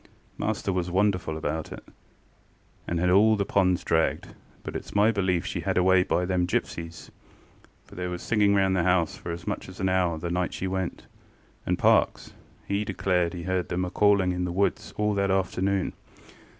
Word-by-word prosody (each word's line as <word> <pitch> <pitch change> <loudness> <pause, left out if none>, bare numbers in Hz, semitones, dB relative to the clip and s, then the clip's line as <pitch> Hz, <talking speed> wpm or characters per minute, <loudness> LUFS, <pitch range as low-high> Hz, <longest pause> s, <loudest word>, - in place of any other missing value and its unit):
Master 95 - -2
was 90 -1 -1
wonderful 90 -3 +1
put - - -4
about, 80 0 -3 1.2
and 85 - -1
had 90 +1 +2
all 110 +4 +5
the 100 -1 -1
ponds 95 -3 +2
dragged; - - 0 0.3
but - - -6
itŌĆÖs - - -7
my 105 +2 +5
belief 95 -5 0
she - - -3
was - - -7
had - - 0
away 95 0 +5
by 90 0 0
them 90 -1 0
gipsies, 85 -1 -4 0.7
for - - -17
there 90 0 -4
was 90 0 -5
singing 105 -2 +3
round 95 -1 +2
the 90 - +2
house 85 -2 +2
for 85 - -7
as 85 0 -7
much - - -4
as 95 - -12
an 95 - +1
hour 90 -3 +1
the 85 +2 -4
night 90 0 -1
she - - -4
went, 95 -1 -3 0.6
and - - +1
Parkes, - - +2 0.3
he 100 +1 -1
declare 90 -4 0
as 85 - -8
he 85 -1 -6
heard 95 -1 -1
them 90 +1 -1
a 90 - -6
calling 100 -3 +3
in 90 0 -2
the 90 - -3
woods 100 +4 -1
all 105 0 +1
that 100 -1 0
afternoon. 95 0 0
90 Hz, 200 wpm, -26 LUFS, 90-100 Hz, 1.2 s, all